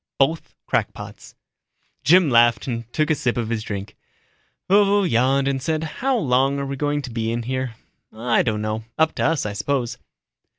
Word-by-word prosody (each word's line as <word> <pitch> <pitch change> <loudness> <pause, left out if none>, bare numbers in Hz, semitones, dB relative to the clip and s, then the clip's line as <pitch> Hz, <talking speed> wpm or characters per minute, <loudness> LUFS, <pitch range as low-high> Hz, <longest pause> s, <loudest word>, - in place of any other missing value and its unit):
Both 155 +4 0
crackpots." - - -4 0.7
Jim 175 -2 +5
laughed 120 -2 +4
and 115 -2 -5
took 155 0 +1
a - - +5
sip 125 -5 -1
of 115 -2 -2
his 115 -2 -1
drink. 100 -2 -6 0.7
Vovo 200 +1 +4
yawned 135 -1 +2
and 135 -1 -1
said, 155 +3 -1
"How 250 - -1
long 135 - +2
are 140 - -2
we 140 0 -4
going 145 +1 -1
to 125 - -7
be 115 -1 -2
in 120 0 -2
here?" 130 -1 -3 0.4
"I 115 +2 +1
don't 105 -3 -1
know. 110 +1 -2
Up 160 0 +3
to - - -2
us, 160 -7 +1
I 105 - -3
suppose." 120 +4 -2
130 Hz, 180 wpm, -22 LUFS, 115-155 Hz, 0.7 s, Jim